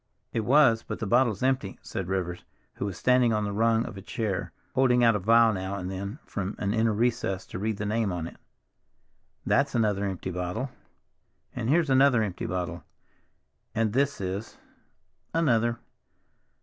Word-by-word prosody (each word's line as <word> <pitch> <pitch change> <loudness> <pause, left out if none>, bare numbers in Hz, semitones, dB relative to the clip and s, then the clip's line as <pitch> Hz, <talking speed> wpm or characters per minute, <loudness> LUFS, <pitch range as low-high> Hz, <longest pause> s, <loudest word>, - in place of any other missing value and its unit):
"It - - 0
was, 120 0 +4
but - - -6
the 115 - -4
bottle's 120 0 +2
empty," 130 -7 0
said 95 - -4
Rivers, 90 -2 -2 0.3
who - - -2
was 100 -2 -4
standing 125 -2 +3
on 105 0 0
the 100 - -2
rung 115 +2 +2
of 110 - -8
a - - -7
chair, 105 -2 -3 0.2
holding 125 -2 +4
out 115 -2 +5
a - - 0
vial 115 +3 +5
now 95 +1 -3
and 90 -1 -4
then 100 +5 -5
from 100 +1 -4
an 100 0 -1
inner 115 0 +2
recess 110 -4 0
to - - -7
read 110 +1 -1
the 105 - -3
name 110 -1 0
on 85 -2 -3
it. - - -9 1.1
"That's 140 -1 +2
another 105 -3 +1
empty 95 -1 -4
bottle—and 95 +4 -7
here's 155 -1 +3
another 130 -3 +5
empty 95 -4 -4
bottle—and, 90 +4 -6
this 140 +2 +1
is—another. 115 - -3
110 Hz, 160 wpm, -27 LUFS, 95-120 Hz, 1.1 s, out